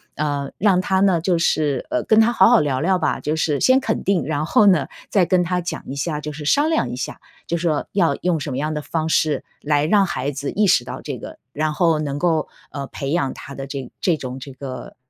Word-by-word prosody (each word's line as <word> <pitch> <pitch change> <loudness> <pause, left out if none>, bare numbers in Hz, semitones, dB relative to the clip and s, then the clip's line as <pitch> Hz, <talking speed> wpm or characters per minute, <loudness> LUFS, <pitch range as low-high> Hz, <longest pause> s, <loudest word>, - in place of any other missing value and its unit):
呃， 145 -2 -2
让 190 -2 +3
他 190 0 +1
呢， 185 -4 +3
就 175 -1 +1
是， 150 -5 +1
呃， - - 0
跟 220 0 +4
他 225 +2 +5
好 190 - +6
好 - - +6
聊 140 -3 0
聊 185 +2 +2
吧。 - - 0
就 155 +1 -1
是 150 -2 0
先 260 +1 +5
肯 220 -4 -2
定， 195 -2 +1
然 155 0 -1
后 210 - +4
呢， 155 -8 +4 0.2
再 190 -4 +3
跟 185 0 +2
他 180 +1 -1
讲 175 - -5
一 135 - -5
下， 150 +1 -2
就 150 - -5
是 150 0 -8
商 290 - +3
量 320 - +1
一 - - -4
下， - - -5 0.3
就 170 - -1
说 160 -3 -1
要 180 -5 +3
用 180 -2 +1
什 145 0 -4
么 130 - -3
样 155 +2 -1
的 150 - -3
方 160 +1 -2
式 155 -2 +1 0.2
来 145 0 +1
让 200 +3 +4
孩 145 -5 -2
子 140 +1 -4
意 210 -1 +2
识 130 -8 +4
到 125 - -7
这 140 -4 -5
个， - - -10 0.2
然 155 +1 -1
后 165 -2 +2
能 145 -1 -3
够， 165 -3 +1 0.2
呃， 140 -1 -5
培 140 0 -5
养 145 -6 0
他 140 - -10
的 135 - -6
这 135 -2 -6
这 170 -4 +2
种 130 -1 -6
这 135 +1 -9
个， 130 -1 -8
155 Hz, 265 characters per minute, -21 LUFS, 140-180 Hz, 0.3 s, 好